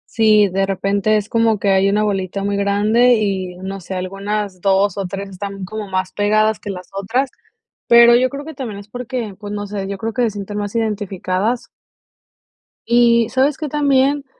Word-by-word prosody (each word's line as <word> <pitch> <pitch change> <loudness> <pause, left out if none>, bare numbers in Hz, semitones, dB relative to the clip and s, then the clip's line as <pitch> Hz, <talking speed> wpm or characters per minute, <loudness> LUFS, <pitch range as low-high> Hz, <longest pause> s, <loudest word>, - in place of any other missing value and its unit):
Sí, 215 -2 +5
de 195 +1 -1
repente 200 +2 +1
es 210 - -3
como 225 -2 +2
que 200 - -1
hay 195 +1 +3
una 210 +1 +2
bolita 195 -1 -2
muy 200 0 -1
grande 210 +5 +3
y, 190 -4 -2
no 195 +1 -6
sé, 185 +1 -7
algunas 195 0 -4
2 195 +1 +2
ó 195 -2 -3
3 195 +2 -5
están 195 0 -6
como 215 +1 -6
más 185 -1 -2
pegadas 215 +1 +2
que 205 - -8
las 185 -2 -6
otras, 240 +8 -1 0.6
pero 235 0 +7
yo 255 +1 +3
creo 285 +1 -7
que 320 - -8
también 235 -7 -6
es 205 - -12
porque, 245 -2 -5
pues, 205 -1 -7
no 205 0 -4
sé, 200 -1 -5
yo 200 0 -4
creo 225 +2 -4
que 250 - -1
se 235 - +2
sienten 205 0 -6
más 205 +2 -5
identificadas. 210 0 -1 1.2
Y, 235 -1 +4
¿sabes 270 +3 +1
qué 305 -3 -4
también? 280 -1 +2
205 Hz, 190 wpm, -19 LUFS, 195-235 Hz, 1.2 s, pero